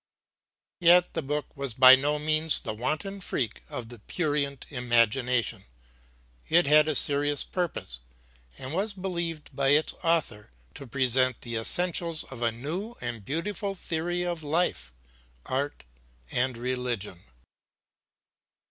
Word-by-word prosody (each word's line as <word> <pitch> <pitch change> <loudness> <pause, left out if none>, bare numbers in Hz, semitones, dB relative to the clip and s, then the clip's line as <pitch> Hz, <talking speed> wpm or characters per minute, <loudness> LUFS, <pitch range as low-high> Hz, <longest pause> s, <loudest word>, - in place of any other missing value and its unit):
Yet 175 0 +5
the 165 - -2
book 150 0 -4
was 140 -5 -4
by 130 0 +9
no 145 +3 0
means 155 +1 +3
the - - -4
wanton 155 - -3
freak 125 -9 -2
of 120 -1 -6
a 120 - -11
prurient 145 - -2
imagination; 120 -3 +1 0.8
it 170 +2 +4
had 150 +1 +6
a 155 - 0
serious 145 0 +3
purpose 165 - -4 0.6
and 130 +3 -7
was 200 +3 -1
believed 170 -4 -5
by 140 -1 +1
its 145 +3 +3
author 155 - 0 0.2
to 140 - -10
present 130 0 +2
the 120 -1 -5
essentials 170 +6 0
of 130 -3 -11
a 115 -1 +1
new 170 - -5
and 120 -3 -5
beautiful 195 - -3
theory 175 0 -2
of 175 -2 -3
life, 155 - -1 0.5
art 140 +3 -3 0.5
and 125 0 0
religion. 120 -7 -3
145 Hz, 130 wpm, -27 LUFS, 125-165 Hz, 0.8 s, by